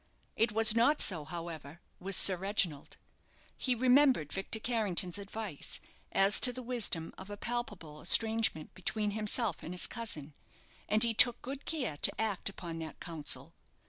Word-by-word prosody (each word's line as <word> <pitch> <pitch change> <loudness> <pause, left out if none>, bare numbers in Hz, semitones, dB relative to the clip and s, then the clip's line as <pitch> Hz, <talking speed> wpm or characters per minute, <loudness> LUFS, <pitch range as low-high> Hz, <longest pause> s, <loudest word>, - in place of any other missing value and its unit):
It 225 0 +1
was 220 0 +5
not 240 +6 +3
so, 165 -6 +2
however, 165 -2 -8 0.2
with 195 +1 -3
Sir 190 - +4
Reginald. 180 -5 -2 0.6
He 255 -2 0
remembered 255 - +3
Victor 195 +3 -2
Carrington's 205 -6 -1
advice 200 -5 -6 0.3
as 195 +2 +3
to 250 - +8
the 255 +1 -7
wisdom 230 -9 0
of 190 +1 -10
a 205 - -7
palpable 205 -11 -5
estrangement 220 -4 +2
between 210 +3 -2
himself 215 +2 +1
and 175 - -7
his 180 - +3
cousin, 155 - -4 0.6
and 215 +2 +3
he 230 -1 +3
took 240 +2 +5
good 275 +2 -7
care 255 - -3
to - - +3
act 210 -3 -2
upon 170 -4 -8
that 160 -1 -8
counsel. 165 -4 -5
205 Hz, 155 wpm, -31 LUFS, 170-230 Hz, 0.6 s, to